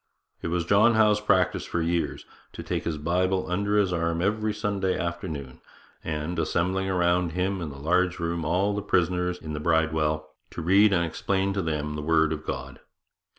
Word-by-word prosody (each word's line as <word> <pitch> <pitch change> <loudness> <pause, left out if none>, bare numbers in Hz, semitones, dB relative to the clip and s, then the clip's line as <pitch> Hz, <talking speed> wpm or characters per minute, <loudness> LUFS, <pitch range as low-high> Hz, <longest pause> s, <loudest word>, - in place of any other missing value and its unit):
It - - -3
was 85 0 -1
John 110 +6 +4
Howe's 105 -1 +4
practice 95 -3 +2
for 85 - -3
years 85 +1 -1 0.3
'to - - -7
take - - -3
his 80 -2 -2
Bible 90 +4 0
under 100 +3 +1
his 95 -3 +2
arm 85 -1 0
every 105 +4 0
Sunday 100 -3 -1
afternoon, 85 -6 -5 0.4
and, 80 +2 -3
assembling 95 +3 0
around 90 -2 +1
him 95 +1 -1
in 80 - -4
the 70 - -9
large 90 +5 +1
room 85 -1 -2
all 95 +6 +1
the 105 - -2
prisoners 90 -2 0
in 80 -3 -7
the 75 - -3
Bridewell, 80 -1 +1 0.2
to - - -6
read 100 +5 +5
and 85 -3 +2
explain 95 +4 -1
to 95 - -1
them 75 -3 -2
the 75 - -4
Word 80 0 +2
of 80 0 -7
God. - - -5
90 Hz, 185 wpm, -26 LUFS, 80-95 Hz, 0.4 s, read